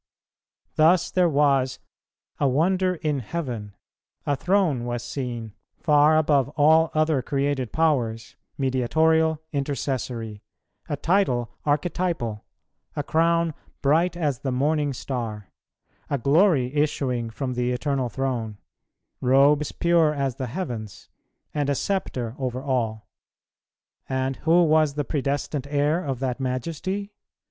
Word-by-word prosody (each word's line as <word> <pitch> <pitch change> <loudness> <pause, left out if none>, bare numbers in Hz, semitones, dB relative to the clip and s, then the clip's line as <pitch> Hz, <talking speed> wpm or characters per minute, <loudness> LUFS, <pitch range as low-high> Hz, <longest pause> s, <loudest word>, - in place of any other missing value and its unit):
Thus 165 +3 +4
there 180 -2 +3
was 140 -3 +2 0.6
"a 145 - +3
wonder 180 +7 +2
in 155 -4 -1
heaven:" 120 -7 -5 0.5
a 145 - +1
throne 175 -6 +1
was 120 -1 -3
seen, 120 -5 -5 0.2
far 150 0 +4
above 145 -4 +2
all 160 +2 +5
other 155 -3 +2
created 135 -2 -1
powers, 120 -9 0 0.2
mediatorial, 160 +5 +2
intercessory; 130 -6 -3 0.5
a 145 - -1
title 135 -10 +1 0.2
archetypal; 150 - -1 0.5
a 145 - -2
crown 165 +1 +2 0.3
bright 165 +5 +2
as 145 -7 -1
the 135 -1 -3
morning 145 +3 +1
star; 115 -6 -5 0.6
a 140 - 0
glory 140 - +3
issuing 130 -5 0
from 125 +3 -4
the 125 0 -1
Eternal 130 0 -1
Throne; 115 -4 -3 0.6
robes 140 +3 +4
pure 170 -3 +2
as 135 -3 -2
the 130 - -3
heavens; 120 - -6 0.4
and 145 -2 -1
a 140 - +1
sceptre 130 - -2
over 130 -1 -3
all; 115 -6 -2 1.0
and 130 0 -1
who 170 +2 +4
was 155 -2 +3
the 145 -1 -1
predestined 140 0 -2
heir 145 +4 +1
of 135 -3 -2
that 130 -1 -2
Majesty? 165 - -3
140 Hz, 120 wpm, -24 LUFS, 125-160 Hz, 1.0 s, all